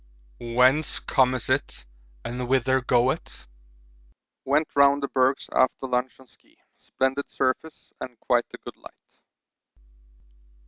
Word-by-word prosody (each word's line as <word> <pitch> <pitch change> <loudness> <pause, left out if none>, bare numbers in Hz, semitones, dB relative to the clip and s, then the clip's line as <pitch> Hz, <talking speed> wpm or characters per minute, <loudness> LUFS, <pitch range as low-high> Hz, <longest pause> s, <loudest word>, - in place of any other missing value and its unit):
Whence 125 +5 +2
comes 130 -2 +1
it 130 - -2 0.4
and 125 +1 -4
whither 130 0 +2
goeth? 125 +1 -1 1.0
Went 150 +3 0
round 140 0 +4
the - - 0
bergs 130 0 +1
after 130 +1 +1
lunch 125 0 -2
on 130 - -17
ski - - -29 0.2
splendid 135 +2 -2
surface 135 +4 -3
and 125 -3 -8
quite 120 0 +1
a - - -9
good - - -11
light. - - -18
130 Hz, 120 wpm, -25 LUFS, 125-135 Hz, 1.0 s, round